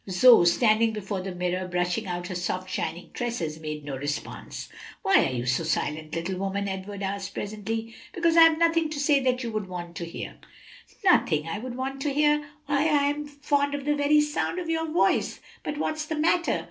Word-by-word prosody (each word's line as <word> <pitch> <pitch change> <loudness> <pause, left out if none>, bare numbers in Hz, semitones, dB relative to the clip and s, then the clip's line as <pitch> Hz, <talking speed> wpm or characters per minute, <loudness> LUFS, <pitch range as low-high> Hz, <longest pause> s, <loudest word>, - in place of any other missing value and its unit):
Zoe, 190 0 +7
standing 220 +4 +3
before 200 -2 -4
the 185 -1 -5
mirror, 180 +1 -1
brushing 180 +4 -1
out 175 -1 -3
her 180 - -5
soft 180 +1 -3
shining 180 -1 -4
tresses, 175 -11 -3
made 155 -2 -6
no 140 -2 -4
response. 145 +2 -5 0.4
"Why - - +5
are - - -3
you 125 -1 -3
so 130 +6 +1
silent, 155 0 -2
little 180 +3 -3
woman?" 195 +1 -2
Edward 195 +1 -5
asked 195 0 -4
presently. 220 +2 -4 0.2
"Because 335 -1 +1
I 335 - +8
have 325 -1 +7
nothing 330 -1 +2
to 305 -2 -4
say 285 0 +4
that 255 -1 0
you 230 - -3
would 215 -3 -3
want 175 -2 -7
to 170 - -4
hear." 170 - -7 0.7
"Nothing 160 - +4
that 165 - -5
I 205 - -3
would 245 +1 -6
want 270 +1 -4
to 290 - 0
hear? 295 +1 +4 0.3
why, 290 0 +1
I 295 -3 +3
am 295 0 -5
fond 285 0 0
of 280 -1 -5
the 295 - +2
very 295 +1 +4
sound 300 +4 -1
of 350 -2 -4
your 325 -1 -1
voice. 335 - +2 0.2
But 295 - -4
what's 310 0 -2
the 315 - -2
matter?" 335 +3 +2
215 Hz, 210 wpm, -26 LUFS, 180-290 Hz, 0.7 s, I